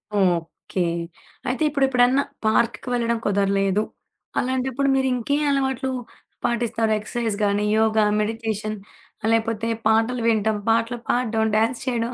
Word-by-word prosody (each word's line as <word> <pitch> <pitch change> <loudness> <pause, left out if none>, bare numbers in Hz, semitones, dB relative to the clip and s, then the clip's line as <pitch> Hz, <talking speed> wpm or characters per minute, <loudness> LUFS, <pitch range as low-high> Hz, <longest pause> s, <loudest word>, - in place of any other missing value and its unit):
Okay. 180 -2 0 0.7
అయితే 255 +5 0
ఇప్పుడు 275 -2 +2
ఎప్పుడన్నా 255 +2 +3 0.2
పార్క్‌కి 230 +3 +1
వెళ్ళడం 235 -1 +1
కుదరలేదు. 195 0 +2 0.6
అలాంటప్పుడు 260 +2 0
మీరింకే 265 0 +1
అలవాట్లు 265 -1 0 0.5
పాటిస్తారు 235 -2 0
ఎక్సర్సైజ్ 225 0 -2
గానీ, 205 +1 +1
యోగా, 220 -1 +3 0.2
మెడిటేషన్ 215 -1 -2 0.5
లేపోతే 225 0 0 0.2
పాటలు 225 +2 +2
వినడం, 220 -1 +2
పాటలు 230 +2 +2
పాడడం, 230 -3 +1
డాన్స్ 225 +3 +1
చేయడం 235 -1 -1
230 Hz, 110 wpm, -23 LUFS, 215-250 Hz, 0.7 s, ఎప్పుడన్నా